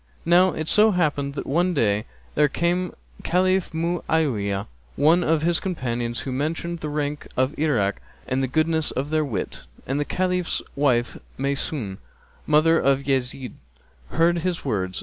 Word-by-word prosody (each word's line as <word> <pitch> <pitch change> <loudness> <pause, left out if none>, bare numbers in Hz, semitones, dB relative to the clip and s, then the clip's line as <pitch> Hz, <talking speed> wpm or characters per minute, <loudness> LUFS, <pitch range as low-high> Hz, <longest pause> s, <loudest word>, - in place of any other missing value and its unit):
Now 180 +2 +5
it 155 - -4
so 215 +5 +6
happened 145 -7 0
that - - -4
one 175 +5 +1
day 105 -4 +1 0.3
there 150 0 +4
came 175 +4 0
to - - -17 0.2
the - - -14
Caliph 185 +1 +1
Mu'áwiyah[FN#266] 155 - 0 0.3
one 160 +5 +4
of 160 -1 +1
his 170 0 +3
companions, 120 - -3
who 135 - -5
mentioned 165 +5 -2
the 155 - -4
people 145 0 -3
of 130 +3 +2
Irak 120 -11 0 0.3
and 130 +1 0
the 130 - 0
goodness 160 +3 +2
of 140 +3 -3
their 155 0 +2
wit; 115 -10 -4 0.2
and 135 +2 -1
the 145 - 0
Caliph's 180 0 -1
wife 125 -4 +1 0.2
Maysún, 135 -7 -2 0.5
mother 155 +2 +4
of 135 0 +2
Yezíd, 130 -1 -1 0.6
heard 170 +1 +2
his 175 -2 -2
words. 95 -7 -1
150 Hz, 160 wpm, -24 LUFS, 130-170 Hz, 0.6 s, so